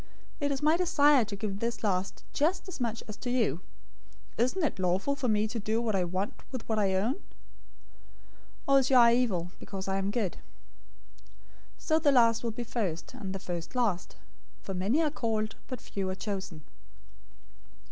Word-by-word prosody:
It 285 -2 0
is 275 +1 -2
my 310 +2 +5
desire 295 -7 +5
to 205 -1 -5
give 205 +1 -3
to 195 - -6
this 230 +1 -2
last 190 -2 -1
just 335 +7 +1
as 370 - -7
much 230 -1 -2
as 215 - -6
to 250 - -5
you. 220 - +1 0.8
020:015 - - +6
Isn't 345 +8 -2
it 295 - -1
lawful 185 +9 +1
for 280 -2 -2
me 215 -1 +2
to 230 +2 -4
do 220 +2 0
what 230 -2 0
I 185 -2 +2
want 185 +4 -3
to - - -18
with 255 -4 -6
what 220 -1 +1
I 195 -2 +2
own? 235 - 0 1.5
Or 275 0 +6
is 265 - +1
your 265 - +6
eye 235 -1 +8
evil, 190 -9 +1
because 190 -1 -6
I 190 0 0
am 195 0 -1
good?' 205 -4 -1 1.4
020:016 - - -24
So 315 0 +3
the 295 -2 +4
last 230 -3 +4
will 235 - 0
be 230 +2 -4
first, 195 -8 -3
and 215 -7 -6
the 195 - -3
first 175 +2 -6
last. 215 -8 0 0.5
For 195 - -4
many 205 - +2
are 300 - +1
called, 220 -5 -1
but 255 -3 -5
few 195 -4 -4
are 185 - -2
chosen." 190 -6 -5
225 Hz, 200 wpm, -30 LUFS, 195-255 Hz, 1.5 s, eye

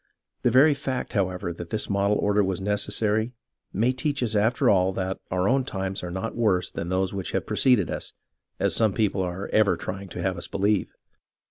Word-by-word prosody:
The - - +3
very 145 +4 +6
fact, 135 -2 -4
however, 95 -3 -1
that 85 0 -8
this 110 - -2
model 100 +1 +1
order 105 0 +2
was 95 -2 -1
neces 105 +1 -1
sary 110 +3 +1 0.4
may 115 +6 +2
teach 140 +1 -1
us 115 -2 -1
after 115 +6 +2
all 95 -3 +4
that 95 0 -3
our 90 +1 0
own 130 +3 +3
times 95 -5 -4
are 90 - -4
not 95 +6 -4
worse 95 -6 +1
than 85 - -5
those 95 +1 0
which 95 -2 -4
have - - -1
preceded 125 - +2
us, - - -4 0.5
as - - +1
some 110 -3 +3
people 105 -3 +1
are 90 +2 -3
ever 110 -2 +4
trying 95 +1 -6
to 85 - -6
have 95 -2 -1
us - - -4
believe. 100 0 0
100 Hz, 205 wpm, -25 LUFS, 95-110 Hz, 0.5 s, very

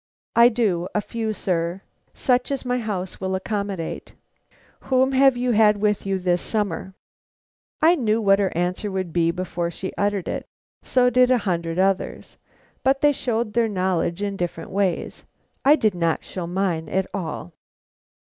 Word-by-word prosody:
"I 235 +1 +8
do; 205 -7 0
a - - +3
few, 225 0 -3
sir; 180 -2 -2 0.3
such 250 -2 +1
as 275 -2 -3
my 250 0 0
house 195 -6 -4
will 190 0 -1
accommodate." 200 -3 -4 0.7
"Whom 260 0 +3
have 270 -1 +4
you 245 0 0
had 210 -2 +5
with 210 -1 0
you 195 0 +1
this 180 -1 0
summer?" 190 -3 -2 0.9
I 330 +2 +7
knew 225 -9 +1
what 195 -2 +4
her 195 -2 +1
answer 180 +4 -1
would 185 -4 -3
be 165 -1 +2
before 175 -1 -2
she 190 +2 -6
uttered 200 -2 0
it; - - -4 0.3
so 250 -1 +2
did 250 0 +4
a 255 - +5
hundred 170 -3 -1
others, 190 0 -1 0.5
but 270 +1 +2
they 295 - +5
showed 235 -5 -2
their 235 -1 +2
knowledge 185 -1 -1
in 200 -1 -2
different 170 -2 -4
ways. 195 -3 -1 0.4
I 285 +3 +7
did 215 -9 +1
not 170 -2 0
show 180 -3 -6
mine 175 -3 -1
at 190 0 0
all. 160 - -5
200 Hz, 165 wpm, -23 LUFS, 180-235 Hz, 0.9 s, I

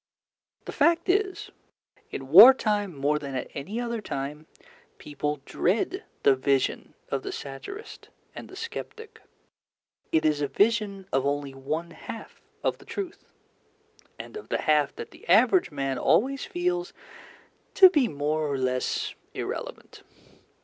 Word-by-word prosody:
The - - -5
fact 335 +4 +2
is, 385 0 0 0.6
in 135 -1 -7
war 215 - +11
time 205 - -1
more 145 +2 +1
than 140 -2 -6
at 130 - -4
any 195 +12 -5
other 235 -2 -3
time, 150 -3 -5 0.5
people 150 0 -4
dread 230 - -1 0.2
the 135 - +6
vision 135 0 0
of 140 - -1
the - - -5
satirist 395 - -8 0.2
and - - -9
the 375 - -11
sceptic. 450 +1 -8 0.9
It 160 -1 +2
is 150 -1 +2
a 145 - +1
vision 200 +3 +1
of 135 0 +2
only 140 -1 -2
one 155 +6 -4
half 195 +7 -10 0.2
of - - 0
the - - -16
truth, 385 -4 -7 0.9
and - - -9
of 430 - -9
the - - -1
half 150 -2 +2
that - - -8
the - - -16
average 245 - +5
man 135 -2 -3
always 275 - +2
feels 355 0 -2 0.8
to 375 -2 +9
be 290 -8 +3
more 150 -1 -1
or 140 - -1
less 130 -1 -1 0.2
irrelevant. - - -6
170 Hz, 140 wpm, -26 LUFS, -, 0.9 s, war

